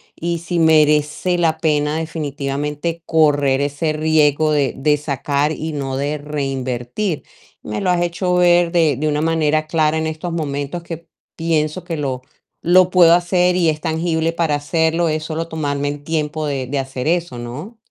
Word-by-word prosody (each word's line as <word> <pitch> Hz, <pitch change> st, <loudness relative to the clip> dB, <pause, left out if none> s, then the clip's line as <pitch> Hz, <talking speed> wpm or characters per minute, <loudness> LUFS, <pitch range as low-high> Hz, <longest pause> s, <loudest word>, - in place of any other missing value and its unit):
y 170 Hz, +1 st, -2 dB
si 170 Hz, +1 st, -2 dB
merece 155 Hz, +2 st, +3 dB
la 160 Hz, -2 st, +2 dB
pena 150 Hz, -1 st, 0 dB
definitivamente 150 Hz, 0 st, -3 dB
correr 145 Hz, -4 st, +3 dB
ese 145 Hz, +2 st, -1 dB
riesgo 155 Hz, -1 st, +2 dB
de 145 Hz, -3 st, +1 dB
de 150 Hz, +2 st, +2 dB
sacar 145 Hz, 0 st, -1 dB
y 160 Hz, 0 st, -4 dB
no 135 Hz, -2 st, -3 dB
de 145 Hz, +2 st, -1 dB
reinvertir". 135 Hz, -, -3 dB, 0.4 s
Me 105 Hz, 0 st, -4 dB
lo 185 Hz, -, +1 dB
has 175 Hz, -1 st, +1 dB
hecho 175 Hz, +1 st, -1 dB
ver 175 Hz, -1 st, +4 dB
de 165 Hz, -5 st, +3 dB
de 155 Hz, +3 st, -1 dB
una 150 Hz, 0 st, 0 dB
manera 155 Hz, -1 st, +1 dB
clara 155 Hz, -1 st, +1 dB
en 160 Hz, -, -1 dB
estos 160 Hz, +2 st, -4 dB
momentos 145 Hz, 0 st, -3 dB
que 170 Hz, -1 st, -8 dB, 0.3 s
pienso 165 Hz, +1 st, -1 dB
que 175 Hz, -2 st, -4 dB
lo 135 Hz, -4 st, -3 dB, 0.4 s
lo 180 Hz, +1 st, +5 dB
puedo 175 Hz, -3 st, +6 dB
hacer 180 Hz, 0 st, +2 dB
y 175 Hz, -3 st, +3 dB
es 155 Hz, -1 st, -2 dB
tangible 160 Hz, 0 st, -1 dB
para 165 Hz, -3 st, 0 dB
hacerlo, 160 Hz, +3 st, +1 dB
es 155 Hz, 0 st, -2 dB
solo 160 Hz, +1 st, -4 dB
tomarme 145 Hz, -3 st, -2 dB
el 145 Hz, 0 st, -4 dB
tiempo 155 Hz, -1 st, -2 dB
de 135 Hz, -3 st, -2 dB
de 140 Hz, +3 st, -2 dB
hacer 135 Hz, 0 st, -3 dB
eso, 170 Hz, -6 st, -1 dB
¿no? 150 Hz, -, -8 dB
155 Hz, 170 wpm, -19 LUFS, 145-165 Hz, 0.4 s, puedo